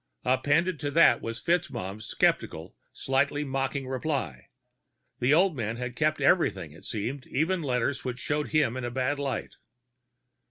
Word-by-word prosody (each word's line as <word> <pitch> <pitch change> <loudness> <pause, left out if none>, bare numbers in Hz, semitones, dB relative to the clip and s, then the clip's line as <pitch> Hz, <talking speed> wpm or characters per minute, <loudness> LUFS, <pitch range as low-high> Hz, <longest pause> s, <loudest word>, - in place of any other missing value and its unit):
Appended 145 +7 +2
to 145 - -2
that 145 -5 +5
was 115 +1 -5
FitzMaugham's 110 - -2
skeptical, - - 0 0.2
slightly 140 +2 0
mocking 135 0 -2
reply; 130 - -3 0.7
the 125 +3 +2
old 175 +2 +4
man 115 -2 -3
had 125 0 -5
kept 155 +1 +1
everything, 95 - +2
it 80 - -15
seemed, 125 +6 -4
even 170 +6 0
letters 130 -1 -1
which 125 -1 -3
showed 145 +3 -1
him 150 -6 +2
in 130 - -4
a 120 - -2
bad 130 +3 -1
light. 140 -2 -3
135 Hz, 150 wpm, -28 LUFS, 120-150 Hz, 0.7 s, that